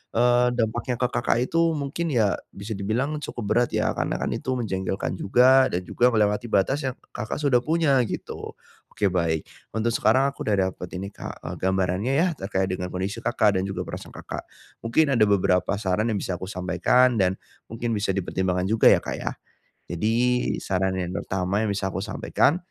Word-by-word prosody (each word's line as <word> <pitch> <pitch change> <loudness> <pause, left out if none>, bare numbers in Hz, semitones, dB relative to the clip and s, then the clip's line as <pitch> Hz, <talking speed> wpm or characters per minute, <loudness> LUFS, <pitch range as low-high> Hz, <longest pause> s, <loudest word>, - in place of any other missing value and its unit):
eee, 120 +1 +4
dampaknya 120 +2 -1
ke 125 - +1
Kakak - - +1
itu 165 +3 +2
mungkin 145 +4 -3
ya 110 -5 +3 0.2
bisa 100 +3 -7
dibilang 115 +9 -1
cukup 120 -4 -5
berat 120 +1 +2
ya - - +1
karena - - -2
kan - - -1
itu 130 - -2
menjengkelkan 95 -6 -2
juga 130 +5 +5
dan 90 +1 -2
juga 120 +7 +3
melewati 105 +1 +1
batas 135 +9 +2
yang 130 - -3 0.2
Kakak 110 - -4
sudah 135 -5 +3
punya 155 -2 +2
gitu, - - -6 0.4
oke 105 - -2
baik 80 -3 0 0.3
untuk 110 +1 +1
sekarang 125 +5 +3
aku - - -13
udah 95 -3 +2
dapet 90 - -8
ini 100 +2 -5
Kak, - - -8
eee, - - -4
gambarannya 95 +5 0
ya 165 +6 +3
terkait 95 -1 -1
dengan 90 -1 -3
kondisi 95 +5 -3
Kakak 105 -3 +2
dan - - -1
juga 95 - -3
perasaan - - -7
Kakak, - - -6 0.4
mungkin 140 +5 +2
ada 115 -4 +4
beberapa 90 -1 +2
saran 105 +2 0
yang 110 - 0
bisa 90 -2 -3
aku 95 - -4
sampaikan 95 +7 +2
dan, 95 0 +1 0.3
mungkin 115 +1 -3
bisa 105 -1 -1
dipertimbangkan 90 -1 -1
juga 110 0 +4
ya - - +6
Kak - - -3
ya, - - -3 0.6
jadi 105 +6 0 0.5
saran 95 0 0
yang 90 -1 -3
pertama 95 +2 -1
yang - - -1
bisa 95 -1 -2
aku 95 - -3
sampaikan, 145 - +1
105 Hz, 185 wpm, -25 LUFS, 95-125 Hz, 0.6 s, ya